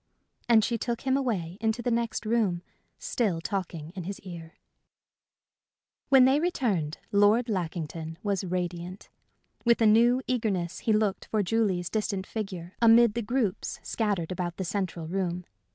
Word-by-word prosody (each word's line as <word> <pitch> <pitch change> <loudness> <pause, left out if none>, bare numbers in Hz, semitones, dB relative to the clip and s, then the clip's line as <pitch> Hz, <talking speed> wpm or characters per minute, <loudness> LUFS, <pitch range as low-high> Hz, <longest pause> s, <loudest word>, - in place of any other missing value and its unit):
And 225 -2 +6
she 230 +1 -1
took 235 +1 -2
him 265 -1 +1
away 200 -10 -2
into 225 +2 0
the 245 - 0
next 230 -1 -1
room, 215 -6 +1 0.3
still 200 -9 -1
talking 165 -3 -4
in 180 -2 -7
his 200 +2 -5
ear. 170 -4 -9 1.5
When 265 -2 +7
they 270 +3 +4
returned, 220 - 0
Lord 205 +4 +4
Lackington 165 -4 -4
was 200 -3 0
radiant. 180 0 -4 0.5
With 235 -1 +4
a 225 - +4
new 240 +4 +5
eagerness 195 -8 -1
he 225 - 0
looked 215 -2 +1
for 215 -2 0
Julie's 190 -4 0
distant 205 -3 -1
figure 190 -5 -6
amid 230 -1 +6
the 235 - -1
groups 225 -3 -1
scattered 200 -7 -1
about 175 -1 -3
the 190 - -3
central 175 -3 -3
room. 180 0 -2
200 Hz, 150 wpm, -28 LUFS, 175-230 Hz, 1.5 s, When